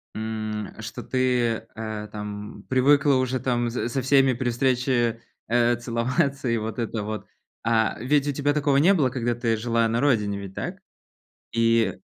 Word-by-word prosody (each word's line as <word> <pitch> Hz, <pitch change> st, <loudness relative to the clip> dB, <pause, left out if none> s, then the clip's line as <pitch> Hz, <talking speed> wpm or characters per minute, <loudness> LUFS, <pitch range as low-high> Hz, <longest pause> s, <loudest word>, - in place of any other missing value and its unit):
м, 110 Hz, -1 st, -4 dB
что 110 Hz, +1 st, -6 dB
ты, 125 Hz, -3 st, 0 dB
э, 110 Hz, -1 st, -5 dB
там 105 Hz, 0 st, -7 dB
привыкла 140 Hz, +2 st, +4 dB
уже 130 Hz, 0 st, 0 dB
там 120 Hz, -2 st, 0 dB
с 120 Hz, 0 st, -2 dB
со 135 Hz, +2 st, -1 dB
всеми 135 Hz, 0 st, +4 dB
при 120 Hz, +1 st, -1 dB
встрече, 120 Hz, -1 st, +1 dB, 0.3 s
э, 120 Hz, +1 st, +3 dB
целоваться, 125 Hz, +3 st, -1 dB
и 115 Hz, -, +2 dB
вот 110 Hz, +2 st, -4 dB
это 115 Hz, -2 st, -2 dB
вот, 110 Hz, 0 st, -5 dB, 0.4 s
а 110 Hz, -1 st, +2 dB
ведь 140 Hz, +4 st, +1 dB
у 145 Hz, -, +2 dB
тебя 145 Hz, +1 st, 0 dB
такого 145 Hz, -2 st, +2 dB
не 175 Hz, +8 st, +5 dB
было, 140 Hz, -7 st, +2 dB
когда 120 Hz, -2 st, -1 dB
ты 115 Hz, -1 st, 0 dB
жила 115 Hz, +1 st, +1 dB
на 115 Hz, +2 st, 0 dB
родине, 105 Hz, -8 st, +1 dB
ведь 95 Hz, -1 st, -9 dB
так? -, -, -5 dB, 0.7 s
И 115 Hz, -3 st, +2 dB
120 Hz, 170 wpm, -25 LUFS, 110-130 Hz, 0.7 s, не